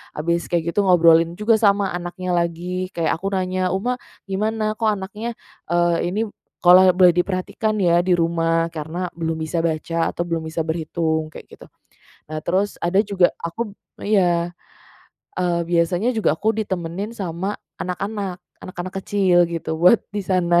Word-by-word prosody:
habis 170 +3 -1
kayak 170 -1 0
gitu 200 +1 +1
ngobrolin 170 -1 +5
juga 210 +2 +3
sama 200 -2 +3
anaknya 180 +1 -4
lagi, 175 +2 -1
kayak 165 -2 +1
aku 195 - -3
nanya, 185 0 0
"Uma, 245 +6 -1 0.3
gimana? 215 +2 -1
Kok 220 0 -1
anaknya," 210 +3 -4 0.3
eee, 175 0 +2
"ini 205 +5 -1 0.4
kalau 185 +1 +8
boleh 180 -1 +7
diperhatikan 185 +4 -1
ya 175 -3 +3
di 180 0 +2
rumah, 165 0 +1
karena 160 +3 -4
belum 165 -1 -1
bisa 160 +2 -2
baca 165 0 -1
atau 175 - -3
belum 165 -2 -3
bisa 160 0 -2
berhitung." 160 -1 -1
Kayak - - -11
gitu. - - -14 0.7
Eee, 155 - -3
terus, 190 +4 0
ada 190 +4 +2
juga 195 -4 +2
aku 200 +6 -4 0.3
iya, 175 -4 +2 0.9
eee, 175 -1 +1
biasanya 175 +6 +2
juga 220 - +2
aku 215 +7 0
ditemenin 190 +1 -3
sama 190 0 -3 0.2
anak-anak, 195 0 -4 0.2
anak-anak 185 0 -7
kecil 190 -3 +3
gitu, 165 -1 -4
buat 180 +7 +6
di 205 0 -3
sana. 175 -2 +3
180 Hz, 150 wpm, -21 LUFS, 170-195 Hz, 0.9 s, kalau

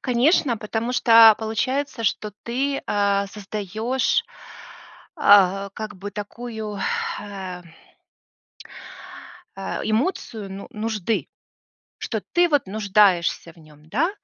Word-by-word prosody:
Конечно, 250 0 +2
потому 225 +3 -3
что, 230 -2 +8
а, - - +4
получается, 255 +4 -2
что 210 +1 -1
ты, 275 +4 -2
а, 200 -1 +1
создаешь, 215 +5 -2 0.9
а, 195 0 +5
как 210 +1 -7
бы 200 +2 -7
такую, 215 0 -6 0.4
э 190 -3 -7 1.9
э, 195 - -4
эмоцию 220 - -2
ну 195 +1 -8
нужды, 220 -1 -2 0.7
что - - -4
ты 350 0 +4
вот 290 -8 +1
нуждаешься 195 -5 +2
в - - -30
нём. 155 -1 -19
Да? 295 - +1
215 Hz, 105 wpm, -23 LUFS, 200-235 Hz, 1.9 s, что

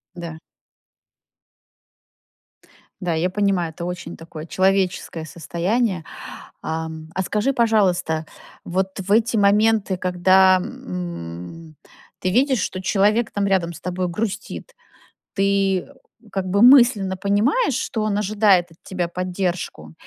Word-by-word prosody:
Да. 165 -2 -7 2.6
Да, 175 -2 0
я 175 +3 0
понимаю, 195 -4 0
это 170 - -7
очень 175 -1 -6
такое 165 -1 -9
человеческое 185 -3 0
состояние. 175 - -1 0.6
Ам, 160 0 -5
а 190 - +1
скажи, 210 +8 0
пожалуйста, 185 - +1 0.4
вот 190 +2 -2
в 190 +1 -7
эти 225 +2 +3
моменты, 205 -1 +3
когда, 185 +1 +4
м, 165 - -7 0.5
ты 185 - 0
видишь, 260 +1 +2
что 185 - -3
человек 210 +4 +2
там 200 -1 0
рядом 175 -3 +1
с - - -11
тобой 180 0 -2
грустит, 215 - -5 0.6
ты 195 -1 +1 0.4
как 190 -1 -2
бы 200 +4 +3
мысленно 240 -7 +6
понимаешь, 220 - +1
что 220 - -2
он 210 -1 0
ожидает 205 -4 +3
от 165 - -19
тебя 180 -2 -3
поддержку? 180 - -4
190 Hz, 115 wpm, -22 LUFS, 175-210 Hz, 2.6 s, мысленно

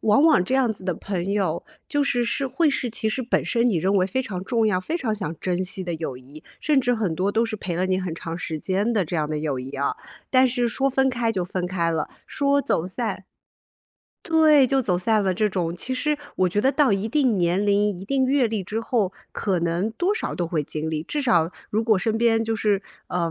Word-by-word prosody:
往 215 +5 +4
往 310 - +5
这 255 - -1
样 260 -3 +3
子 200 -3 -6
的 185 - 0
朋 190 +2 -3
友， 185 -5 -1 0.2
就 290 0 +1
是 245 -3 +1
是 270 +3 -1
会 315 +5 +2
是 265 -3 -1
其 220 0 0
实 255 +4 -2
本 240 - +1
身 235 0 +1
你 210 - +1
认 190 +5 +1
为 185 -1 +3
非 230 +8 -1
常 190 -7 -5
重 225 0 +1
要， 200 -4 +2
非 315 - -3
常 230 -8 -1
想 190 -6 -4
珍 180 -1 -1
惜 185 +1 -3
的 175 -2 -3
友 155 -6 -5
谊， 140 +4 -14 0.2
甚 300 -3 +2
至 245 -2 +2
很 205 -8 -1
多 190 +5 0
都 225 - +2
是 225 -1 -3
陪 185 -4 -4
了 180 +2 0
你 185 0 +1
很 185 -3 -3
长 165 0 -6
时 160 -2 -4
间 195 +8 0
的 215 -4 +2
这 170 +2 -3
样 155 -1 0
的 155 0 -3
友 150 -3 -2
谊 130 +1 -6
啊， 140 0 -1 0.4
但 260 0 +5
是 245 -1 0
说 270 +3 +1
分 265 0 +2
开 240 -3 0
就 190 -4 -1
分 180 0 -3
开 175 -2 0
了， 160 -2 -2 0.2
说 280 0 +2
走 170 -10 0
散 200 0 -3 1.0
对， 315 -6 +5
就 270 +1 +2
走 190 -7 +1
散 215 +3 +2
了 190 -1 +1
这 210 +4 +1
种， 175 -4 -2
其 260 +8 -2
实 300 +4 0 0.2
我 185 - +3
觉 205 +4 0
得 260 +5 +3
到 285 -7 +3
一 200 +2 0
定 250 -4 +2
年 175 +3 +1
龄、 205 0 +3
一 185 -1 -7
定 265 +5 +1
阅 265 -1 +3
历 215 -3 -2
之 215 +5 -3
后， 220 -5 0 0.2
可 190 -5 -1
能 170 +5 0
多 360 - 0
少 450 - -3
都 175 - -2
会 160 -3 -1
经 155 +2 -4
历， 155 -1 -2
至 295 - -3
少 170 -10 +3 0.2
如 215 +2 +1
果 220 -3 +3
身 220 +3 0
边 225 -1 +3
就 225 0 -1
是， 205 -3 +1 0.3
呃， 170 -2 -1
205 Hz, 270 characters per minute, -24 LUFS, 180-245 Hz, 1.0 s, 往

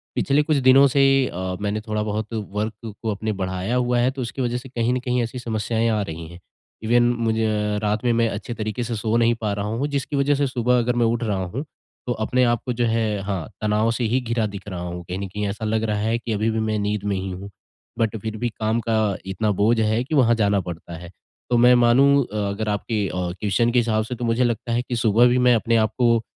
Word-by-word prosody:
पिछले 140 +2 +2
कुछ 155 -1 +1
दिनों 135 +1 +6
से 135 +1 +3 0.2
अ, 90 +1 -4
मैंने 105 +1 -2
थोड़ा 105 -1 -2
बहुत 110 +1 -3
वर्क 105 +1 -4
को 110 -2 -1
अपने 110 +2 -3
बढ़ाया 95 +5 -2
हुआ 125 -1 +1
है, 125 +2 +2
तो 135 -1 -6
उसकी 120 +3 -4
वज़ह 120 -1 -1
से 130 +2 -9
कहीं 120 0 0
न 125 - 0
कहीं 125 0 -1
ऐसी 120 +2 -5
समस्याएँ 115 0 -1
आ 110 -1 +1
रही 80 -3 -6
हैं। 85 +2 -12 0.4
इवन 120 +2 +3 0.2
मुझे 115 -1 +1 0.4
रात 105 +2 0
में 120 - +2
मैं 115 0 +2
अच्छे 110 +3 -5
तरीके 110 +2 -3
से 120 0 -3
सो 110 +1 -1
नहीं 120 0 +3
पा 105 -2 -1
रहा 100 0 -3
हूँ, 115 +7 -1
जिसकी 140 0 -3
वजह 140 +1 +2
से 140 0 +1
सुबह 125 -1 +1
अगर 120 +1 0
मैं 120 -1 +2
उठ 115 +1 0
रहा 100 -4 -1
हूँ, 110 +11 -4 0.4
तो 120 - +1
अपने 125 +3 +2
आप 120 -1 +2
को 125 - -1
जो 120 0 0
है, 110 -3 0
हाँ, 95 -4 -3
तनाव 105 +2 +1
से 120 +1 -2
ही 120 +3 +1
घिरा 115 -2 -1
दिख 100 -1 -9
रहा 95 -3 -5
हूँ। 90 0 -5
कहीं 90 +2 -5
न 100 - -4
कहीं 105 +2 -3
ऐसा 105 +2 -4
लग 110 +1 0
रहा 105 -2 0
है 110 +2 0
कि 115 - -5
अभी 110 +2 0
भी 110 - -1
मैं 110 -1 0
नींद 105 0 -2
में 100 -1 -1
ही 95 +1 -3
हूँ। 95 +2 -7 0.5
बट 115 -1 +1
फिर 110 -1 -4
भी 120 +1 -1
काम 110 +1 +1
का 110 -3 +1
इतना 95 +3 -1
बोझ 110 +4 +2
है 110 +2 +1
कि 150 +4 -3
वहाँ 120 -4 +4
जाना 100 -3 +2
पड़ता 85 -1 -8
है। 85 +1 -10 0.4
तो 120 - +3
मैं 125 +1 +6
मानूँ 135 +4 +5
अ, - - -5
अगर 105 +2 -3
आपके 105 0 -1
अ, - - -5 0.3
क्वेस्चन 115 +3 +1
के 125 - +3
हिसाब 110 -2 +1
से, 125 +3 -5
तो 120 - -4
मुझे 115 +2 +2
लगता 115 0 -1
है 120 - +1
कि 125 0 -4
सुबह 115 +1 +4
भी 125 +1 +2
मैं 125 - +6
अपने 115 +1 +1
आपको 115 +2 +2
अ, 115 - -3
115 Hz, 255 wpm, -22 LUFS, 105-120 Hz, 0.5 s, दिनों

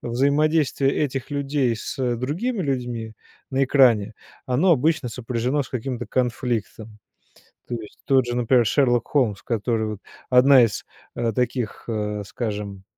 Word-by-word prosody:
взаимодействие 140 +2 +1
этих 135 -2 -2
людей 140 -4 0
с 110 - -6 0.2
другими 170 - -2
людьми 120 -5 -3 0.4
на 135 0 +2
экране, 120 -6 +4 0.3
оно 140 +9 +2
обычно 155 -2 +2
сопряжено 125 +4 -2
с - - -12
каким-то 125 -1 -4
конфликтом. 115 -3 -2 0.7
То 120 - -3
есть 110 -3 -10
тот 135 -2 +3
же, 120 0 -3
например, 120 0 +3
Шерлок 120 -2 +2
Холмс, 120 -9 0
который 115 -1 -1
вот 105 -2 -6 0.3
1 130 +1 +7
из, 115 -3 -1 0.3
э, 115 -1 0
таких, 125 -1 -2
э, 105 -2 -2
скажем, 105 -3 -5
125 Hz, 135 wpm, -23 LUFS, 115-135 Hz, 0.7 s, 1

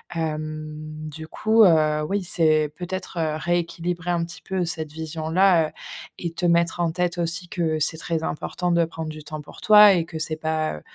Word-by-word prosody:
Hem, 155 -1 -5
du 155 +1 -9
coup, 220 +6 +3
heu, 155 -4 +4
oui, 200 0 0
c'est 155 -4 +2
peut-être, 180 +1 -6
heu, 155 -2 0
rééquilibrer 175 +1 -2
un 170 -1 0
petit 170 - -10
peu 190 -2 -2
cette 160 -3 -4
vision-là, 160 +2 +2
heu - - -12 0.5
et 170 -2 -4
te 175 +1 -2
mettre 170 0 +2
en 170 - +1
tête 175 0 -1
aussi 170 +1 -2
que 160 -3 -1
c'est 160 +2 +1
très 165 0 -2
important 175 +4 -2
de 170 0 +3
prendre 160 -1 -6
du 155 0 -8
temps 155 0 -7
pour 150 - -14
toi 210 -1 +8
et 170 -2 +1
que 165 -1 -8
c'est 155 0 -1
pas, 155 - -1
heu, 75 - -12
165 Hz, 195 wpm, -23 LUFS, 155-175 Hz, 0.5 s, toi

